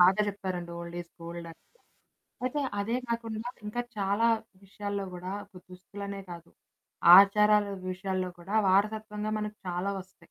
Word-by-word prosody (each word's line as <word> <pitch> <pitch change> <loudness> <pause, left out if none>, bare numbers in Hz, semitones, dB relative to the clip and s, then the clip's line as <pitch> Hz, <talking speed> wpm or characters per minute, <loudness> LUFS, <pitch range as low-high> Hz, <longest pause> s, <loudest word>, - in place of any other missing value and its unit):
బాగా 185 +4 +6
చెప్పారండి 185 -3 -4
ఓల్డ్ 170 0 -7
ఈ - - -4
స్ - - -46
గోల్డ్ 170 0 -6
అని. 165 - -15 0.8
అయితే 275 +3 0 0.2
అదే 230 +4 0
కాకుండా 230 0 -3 0.2
ఇంకా 240 +3 -2 0.2
చాలా 200 +3 +2 0.4
విషయాల్లో 200 0 -4
గూడా 180 +1 -5
ఒక 185 -3 -14
దుస్తులనే 200 +2 -7
కాదు, 170 -1 -9 0.7
ఆచారాల 210 +1 +6 0.2
విషయాల్లో 185 0 -2
కూడా 195 +5 -2
వారసత్వంగా 210 +2 +1
మనకు 210 0 -5
చాలా 180 +3 -1
వస్తాయి. 185 0 -11
200 Hz, 140 wpm, -29 LUFS, 180-210 Hz, 0.8 s, బాగా